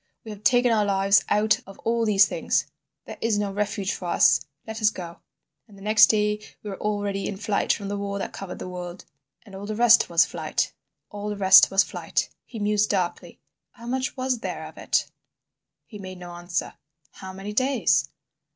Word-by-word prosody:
We 220 - -7
have 210 0 -11
taken 245 0 +4
our 215 -2 +3
lives 195 0 +3
out 215 +1 +3
of 195 - -12
all 230 0 +1
these 205 -1 +6
things. - - -1 0.4
This - - -9
is 225 -2 +1
no 205 -1 -1
refuge 205 -1 -2
for 180 - -7
us. 175 - +4 0.2
Let 220 0 -7
us 215 - +5
go.' 175 -4 -9 0.5
"And 205 -3 -17
the 195 - -13
next 215 +1 +6
day 210 0 +1 0.2
we 210 - -5
were 190 - -8
already 205 -2 -2
in 195 - -5
flight 205 0 0
from 200 - -2
the 205 +1 -3
war 200 0 -3
that 195 - -5
covered 195 -2 -7
the - - -7
world. 180 0 -7 0.4
"And 200 - -15
all 195 +1 -7
the 215 - -3
rest 240 +1 +5
was 170 -1 +4
Flight—all 205 0 -5
the 210 - -4
rest 190 -1 +7
was 195 +1 +4
Flight." - - -3
He 235 - -10
mused 210 0 +1
darkly. 185 -4 -3 0.3
"How 235 - -13
much 260 +3 -2
was 255 -1 -1
there - - -5
of - - -11
it?" - - +1 0.8
He 210 - -11
made 185 -1 -8
no 175 -1 -9
answer. 175 0 -4 0.4
"How 190 0 -10
many 195 +2 -7
days?" 260 +3 +2
205 Hz, 195 wpm, -24 LUFS, 195-215 Hz, 0.8 s, rest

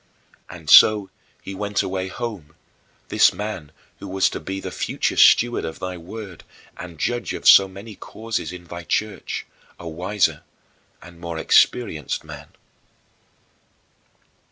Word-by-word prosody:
And 85 -2 -11
so 105 +4 +7 0.3
he 100 - -7
went 100 +1 -2
away 95 0 -3
home, 95 -8 -7 0.5
this - - +5
man 105 -8 -6 0.3
who 100 - -8
was 95 0 +1
to - - -5
be 95 0 -5
the - - -6
future - - -2
steward 120 0 +5
of 80 - -5
thy 90 0 -5
Word 95 +1 -10 0.3
and 85 -3 -10
judge 120 +8 -2
of - - -3
so 95 - +8
many 100 +3 -11
causes 110 -5 -5
in 90 -1 -9
thy 85 0 -9
Church 105 +3 -3 0.3
a 85 - -9
wiser 90 +5 -1 0.6
and 85 -1 -14
more 85 -1 -6
experienced 80 - +1
man. - - -10
95 Hz, 135 wpm, -22 LUFS, 85-105 Hz, 0.6 s, so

